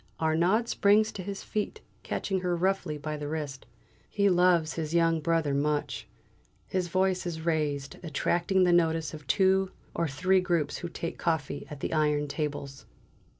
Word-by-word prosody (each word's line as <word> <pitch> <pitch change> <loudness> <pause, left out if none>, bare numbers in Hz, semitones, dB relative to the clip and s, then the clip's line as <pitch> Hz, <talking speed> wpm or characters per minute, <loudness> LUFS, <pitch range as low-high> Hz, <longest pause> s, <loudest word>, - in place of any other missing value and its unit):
Arnaud 170 +8 +2
springs 210 +1 +3
to 195 - -6
his 195 +1 -6
feet, 215 - -3 0.2
catching 195 -1 -2
her 180 -1 0
roughly 185 -3 0
by 150 +1 -4
the 145 0 -5
wrist. 145 -3 -5 0.4
He 200 -1 +2
loves 175 -3 +3
his 160 0 -3
young 165 -1 +3
brother 160 -2 +1
much. 140 -5 -1 0.6
His 185 -2 -1
voice 185 0 +1
is 160 -2 -4
raised, 150 -4 -1
attracting 175 +4 +1
the 180 -1 +4
notice 165 -2 +2
of 150 -3 -10
two 190 +3 +3 0.2
or 170 - 0
three 185 +7 +2
groups 170 -5 0
who 175 - -5
take 170 0 -5
coffee 150 -4 -1
at 145 -2 -8
the - - -2
iron 150 -1 +2
tables. 140 -2 -4
165 Hz, 160 wpm, -28 LUFS, 150-185 Hz, 0.6 s, the